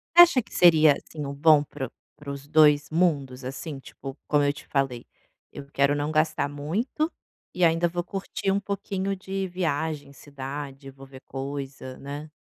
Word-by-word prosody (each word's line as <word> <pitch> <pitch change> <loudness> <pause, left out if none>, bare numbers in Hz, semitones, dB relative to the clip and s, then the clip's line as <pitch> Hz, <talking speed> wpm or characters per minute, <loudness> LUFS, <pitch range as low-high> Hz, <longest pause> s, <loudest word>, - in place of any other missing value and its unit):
Você 345 - +12
acha 330 -7 +4
que - - -18
seria 160 -4 +7
assim 150 0 -7
o 140 - -4
bom 150 0 +5
para 135 -3 -6
o - - -21 0.3
para 145 -1 -9
os 140 0 -7
2 150 -1 +5
mundos 140 -7 +1
assim 135 +3 -6
tipo 135 0 -9
como 145 -1 +3
eu 145 0 +2
te - - -13
falei, 135 -4 -1 0.5
eu 140 - -9
quero 140 +1 +3
não 145 +1 -1
gastar 155 -2 +1
muito, 195 - -2 0.4
e 180 - +1
ainda 165 +1 +3
vou 175 +1 -3
curtir 195 +1 -3
um 200 - +2
pouquinho 195 -1 -3
de 190 0 -4
viagem, 160 -5 -2
cidade, 140 0 -7
eu 135 - -10
vou 135 0 -13
ver 130 -1 -13
coisa, 135 -1 -6
né. 145 +2 -7
145 Hz, 185 wpm, -26 LUFS, 140-170 Hz, 0.5 s, Você